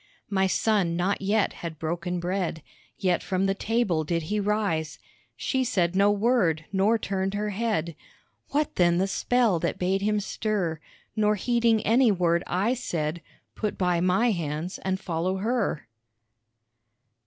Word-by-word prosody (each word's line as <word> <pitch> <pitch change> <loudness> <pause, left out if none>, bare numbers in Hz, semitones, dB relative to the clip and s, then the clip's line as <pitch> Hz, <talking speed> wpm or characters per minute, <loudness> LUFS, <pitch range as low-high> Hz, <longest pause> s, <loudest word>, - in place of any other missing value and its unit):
My 190 -1 +2
son 190 -4 +1
not 185 +3 0
yet 205 +1 +1
had 165 -2 -5
broken 175 +3 -3
bread, 175 -3 -2 0.3
Yet 180 -2 +1
from 190 0 -1
the 195 - +2
table 200 -6 0
did 165 +1 -1
he 210 - +1
rise, 200 -7 -1 0.4
She 265 -1 0
said 185 -8 0
no 200 +1 +5
word 205 -7 +2
nor 200 +4 +3
turned 195 -2 -2
her 210 0 -1
head, 195 -7 -1 0.5
What 295 +1 -1
then 175 -1 +4
the 190 - +2
spell 220 -1 +1
that 170 - -2
bade 190 +2 0
him 210 +1 +1
stir, 195 -6 -2 0.4
Nor 210 0 +2
heeding 230 +1 +2
any 235 +1 +4
word 170 -3 +2
I 200 +7 +1
said, 170 -10 -3 0.3
Put 210 -2 -3
by 180 -2 +1
my 190 +7 +3
hands 165 -1 -3
and 190 0 -2
follow 180 +2 -2
her. 220 - -1
190 Hz, 150 wpm, -26 LUFS, 170-215 Hz, 0.5 s, no